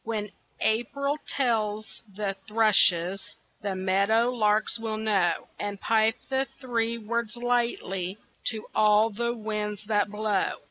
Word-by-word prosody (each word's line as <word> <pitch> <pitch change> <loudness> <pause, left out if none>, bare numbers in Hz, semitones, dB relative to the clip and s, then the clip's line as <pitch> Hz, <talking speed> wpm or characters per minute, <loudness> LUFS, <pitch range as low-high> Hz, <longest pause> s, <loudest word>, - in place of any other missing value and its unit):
When 210 -2 -3 0.3
April 280 +6 0
tells 215 -5 -1
the 200 -1 -2
thrushes, 195 -4 +3 0.3
The 200 -2 -2
meadow 200 +6 +2
larks 215 -2 +1
will 220 -1 -3
know, 200 -6 +1
And 205 -1 -4
pipe 225 +1 +3
the 265 0 +1
three 235 -3 -1
words 230 +1 -3
lightly 235 -6 -1 0.3
To 220 -2 -2
all 215 +1 +4
the 235 +3 -2
winds 210 -1 -3
that 205 -1 +1
blow. 210 -2 0
215 Hz, 125 wpm, -27 LUFS, 205-230 Hz, 0.3 s, all